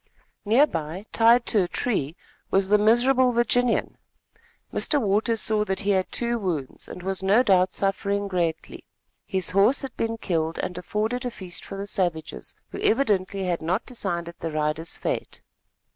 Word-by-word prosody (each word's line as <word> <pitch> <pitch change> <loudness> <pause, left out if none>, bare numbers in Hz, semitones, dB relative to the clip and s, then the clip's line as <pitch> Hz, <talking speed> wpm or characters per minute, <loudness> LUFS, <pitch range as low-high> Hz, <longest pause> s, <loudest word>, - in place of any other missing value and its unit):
Near 235 +8 +5
by, 165 - -5
tied 235 +1 +5
to 215 - +2
a 180 - 0
tree 170 - -2 0.3
was 195 0 +1
the 210 0 +5
miserable 250 +4 +4
Virginian. 240 +1 +1 0.7
Mr. 295 - +2
Waters 220 0 +1
saw 215 -1 +1
that 190 -2 -2
he 205 0 +1
had 190 -1 0
two 235 0 -1
wounds, 165 -10 -4
and 180 - -9
was 190 0 -2
no 200 +6 +4
doubt 185 -4 +3
suffering 200 +1 -1
greatly. 175 -4 -2 0.4
His 190 -3 0
horse 200 +9 +3
had 270 - -6
been 225 0 -2
killed 165 -6 -2
and 180 - -3
afforded 215 +7 -2
a 250 - -2
feast 185 -6 -7
for 195 - -7
the 200 - -4
savages, 175 -5 -2
who - - -7
evidently 200 -6 +1
had 175 -2 -1
not 180 +7 0
yet - - -43
decided 170 -8 -4
the 165 - -3
rider's 155 +2 -2
fate. - - -4
195 Hz, 170 wpm, -25 LUFS, 180-230 Hz, 0.7 s, Near